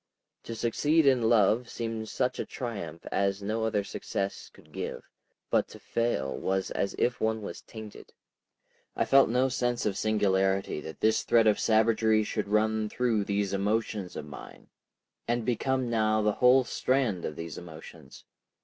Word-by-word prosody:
To 115 - -5
succeed 150 +8 +2
in 125 -5 +4
love 115 +2 +3
seemed 115 -1 -4
such 125 -1 -1
triumph 100 -10 -6
as 100 0 0
no 110 +2 -1
other 105 -2 0
success 100 0 -4
could - - -20
give, - - -5 0.5
but - - +2
to - - -13
fail 115 - -1
was 95 0 -1
as 100 - -2
if 120 -2 0
one 110 -1 0
was - - -7
tainted.... 110 -2 -11 0.8
I - - +1
felt 135 -2 +5
no 125 +3 +2
sense 120 -2 -1
of 100 -3 0
singularity 95 -5 +1
that 80 - -9
this 110 0 +3
thread 115 -1 +3
of 105 -1 +3
savagery 110 0 +3
should 105 0 -3
run 110 +1 +1
through 115 -4 0
these 100 -1 -1
emotions 105 -1 -1
of 75 - -5
mine 75 -2 -12 0.6
and 120 -1 0
become 130 +1 0
now 110 -2 +1
the 105 - +3
whole 125 +1 +6
strand 125 -8 0
of 75 - -4
these 85 -1 -6
emotions. 80 -2 -12
110 Hz, 160 wpm, -28 LUFS, 100-120 Hz, 0.8 s, whole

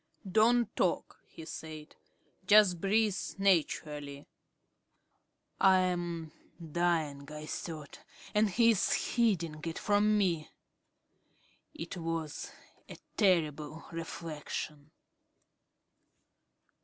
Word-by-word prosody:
"Don't 225 +5 +3
talk," - - 0
he 160 - -11
said. 155 -1 -8 0.5
"Just 200 -5 +6
breathe 210 0 +2 0.2
naturally." 150 -6 0 1.3
"I 190 -1 +6
am 175 -3 -1 0.3
dying," 160 -4 -1
I 150 0 -7
thought, 155 -2 -6 0.3
"and 210 0 +3
he 230 +4 +5
is 205 -4 0
hiding 175 -10 +1
it 165 -1 -4
from 210 +1 +3
me." 170 -6 0 1.3
It 170 +3 -6
was 165 -2 -4 0.4
a - - -9 0.2
terrible 160 -5 +1
reflection. 155 -2 -6
170 Hz, 85 wpm, -32 LUFS, 155-195 Hz, 1.3 s, Just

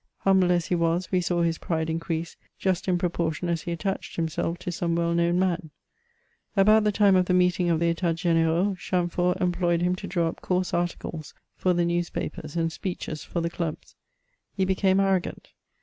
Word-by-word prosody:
Humble 190 -2 +4
as 175 -2 +2
he - - -2
was, 170 +1 0
we 185 -1 +2
saw 175 0 0
his 165 -1 0
pride 160 -2 -1
increase, 165 0 -3 0.2
just 190 -1 -1
in 180 -1 +2
proportion 175 -1 -1
as 170 -2 0
he 170 - -5
attached 195 +3 -3
himself 165 +1 -2
to 180 0 -5
some 170 -1 -1
well 170 0 +1
known 170 +1 +2
man. 180 -3 0 0.9
About 215 +2 +5
the 210 - +3
time 200 -2 +4
of 180 -1 +3
the 180 - +3
meeting 180 -1 +2
of 165 -2 +2
the 170 0 +2
Etats 165 -1 -2
O^n^ranx, 170 +3 +2
Chamfort 180 0 0
employed 175 -1 +1
him 180 +1 +2
to - - -6
draw 175 -2 0
up 165 - -6
coarse 180 0 -1
articles 170 -2 -3 0.2
for 185 - +1
the 175 0 +2
newspapers, 170 -3 -3
and 165 -1 0
speeches 165 -3 -5
for 170 - -3
the 170 - -1
clubs. 165 -3 -5 0.6
He 190 - +1
became 190 0 +2
arrogant. 195 -2 0
175 Hz, 190 wpm, -26 LUFS, 170-185 Hz, 0.9 s, About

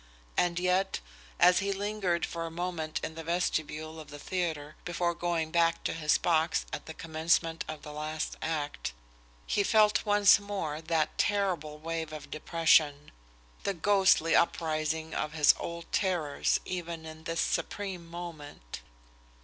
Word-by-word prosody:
And 175 -1 +2
yet, 180 +2 +1 0.4
as 180 - +6
he 200 +1 -1
lingered 195 -3 -1
for 165 -1 -4
a - - -5
moment 165 -2 -3
in - - -3
the 165 0 -7
vestibule 160 -2 -2
of 155 - -10
the 145 - -8
theatre, 155 -3 -3
before 175 0 0
going 170 -2 -1
back 165 0 +2
to - - -1
his 155 -2 +2
box 160 -1 +1
at - - -5
the 160 - -7
commencement 165 0 0
of 155 -1 -7
the 150 - -8
last 155 +1 -3
act, 150 - -3 0.5
he 205 - +1
felt 210 0 +4
once 205 -1 +6
more 190 -7 -4
that 160 -1 0
terrible 180 -7 0
wave 165 0 -4
of 150 -2 -8
depression, 155 -2 +2 0.5
the 200 - -1
ghostly 190 -2 +4
uprising 160 -1 0
of 150 0 -2
his 150 -2 +6
old 170 0 -5
terrors 175 -7 +1
even 170 -3 -4
in 160 0 -10
this 165 0 0
supreme 190 -4 -2
moment. 160 - -8
165 Hz, 150 wpm, -30 LUFS, 155-180 Hz, 0.5 s, as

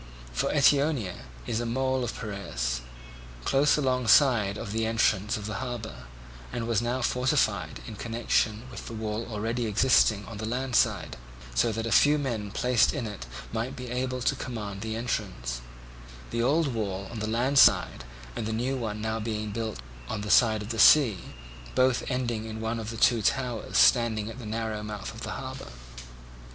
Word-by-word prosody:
For - - 0
Eetionia 140 - +2 0.2
is 110 - -1
a 120 - -2
mole 130 +2 0
of 120 - -4
Piraeus, - - -3 0.6
close 145 +3 +3
alongside 125 -5 +3
of 105 -2 -6
the 110 +1 0
entrance 110 -2 +1
of 105 - -7
the 105 0 -4
harbour, 120 - -6 0.4
and 115 - -3
was 115 -2 +1
now 120 +2 -1
fortified 125 +2 0
in 110 - -8
connection 115 -1 0
with - - -8
the 115 - -6
wall 110 +1 -3
already 115 +2 -2
existing 110 -1 +3
on 115 - -8
the 110 +1 -4
land 125 +1 -2
side, - - +1 0.4
so 60 - +2
that 110 +1 -3
a 115 - -3
few 145 +8 +5
men 115 -8 -3
placed 125 +2 +2
in 135 -5 -2
it 105 - -7 0.3
might 115 +4 -2
be 125 -2 -7
able 125 0 -2
to 140 - +2
command 105 -7 -6
the 110 +1 -3
entrance; - - -3 0.7
the 115 - -1
old 140 +2 +2
wall 100 -4 -3
on 120 - -6
the 110 - -2
land 125 +5 +2
side - - +5 0.3
and 110 - -3
the 110 - -2
new 125 +4 -1
one 110 -4 -4
now 110 +1 -2
being 110 -1 -3
built 110 - -4 0.3
within - - -3
on - - -4
the 105 - -3
side 110 -3 +4
of 105 - -8
the 115 -2 -3
sea, 120 - +7 0.6
both 130 -1 +3
ending 120 -4 -2
in 110 0 -6
one 110 +1 -2
of 110 0 -5
the 115 - -6
two 115 0 +4
towers 120 +1 -1
standing 110 - +4
at 120 - -10
the 115 - -7
narrow 110 -1 -3
mouth 105 -1 -6
of - - -10
the - - -4
harbour. - - -7
115 Hz, 185 wpm, -27 LUFS, 105-125 Hz, 0.7 s, sea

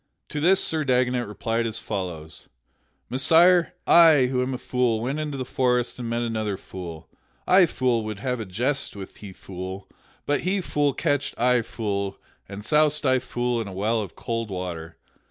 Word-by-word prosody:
To 150 - -3
this 185 +5 +4
Sir 160 -1 0
Dagonet 125 -2 +1
replied 115 +3 -2
as 110 0 -2
follows: 85 -8 -5 0.6
"Messire, 165 +7 +4
I, 160 -6 +7
who 125 -1 +1
am 130 +1 -1
a - - -4
fool, 125 -3 0
went 135 +6 -2
into 150 -2 -3
the 130 - -3
forest 125 -1 0
and 120 -2 -4
met 120 +1 -1
another 110 -4 -2
fool. 85 -5 -9 0.4
I 185 -1 +6
fool 125 -6 0
would 110 -1 -4
have 125 +3 -2
a 110 - -4
jest 120 +10 -2
with 95 -2 -9
he 100 -2 -9
fool, 95 +1 -8 0.4
but 145 - +1
he 190 +3 0
fool 145 -6 0
catched 145 0 -1
I 125 0 +3
fool 100 -4 -3 0.3
and 100 +1 -7
soused 150 +1 +3
I 130 -1 +4
fool 120 -1 -2
in 110 - -5
a 95 - -7
well 110 +4 0
of 100 -5 -8
cold 115 -1 -3
water. 85 -3 -6
120 Hz, 180 wpm, -25 LUFS, 100-135 Hz, 0.6 s, I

